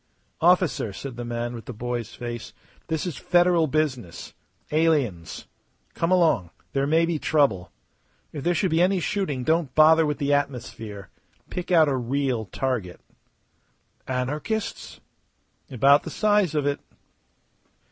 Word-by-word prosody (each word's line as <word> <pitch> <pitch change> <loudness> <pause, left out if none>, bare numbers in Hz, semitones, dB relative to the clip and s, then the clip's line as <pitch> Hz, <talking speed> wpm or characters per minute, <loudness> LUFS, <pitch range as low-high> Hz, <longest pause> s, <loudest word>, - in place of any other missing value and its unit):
"Officer," 175 - +3
said 130 +5 -7
the 120 - -5
man 120 0 -3
with 115 -3 -8
the 125 - -7
boy's 120 0 -4
face, 120 -1 -6 0.3
"this 160 0 -2
is 170 -8 -4
Federal 175 -2 +3
business. 135 - -2 0.4
Aliens. 140 - 0 0.5
Come 165 - -1
along. 165 - +3 0.2
There 140 0 +1
may 165 +3 +3
be 165 -2 -2
trouble. 140 - +1 0.6
If 145 -3 -6
there 175 +2 +1
should 180 +2 0
be 165 +1 +3
any 185 +1 +3
shooting 165 -8 -2
don't 160 -2 0
bother 160 +1 +6
with 150 - -1
the 145 -1 0
atmosphere. 120 -8 -3 0.4
Pick 180 - -5
out 165 -4 +5
a 140 - +1
real 130 -2 -1
target." 110 -4 -3 1.1
"Anarchists?" 145 - -3 0.7
"About 140 +3 +5
the - - -7
size 205 -6 +2
of 150 -2 +1
it." 145 0 0
145 Hz, 135 wpm, -25 LUFS, 120-165 Hz, 1.1 s, bother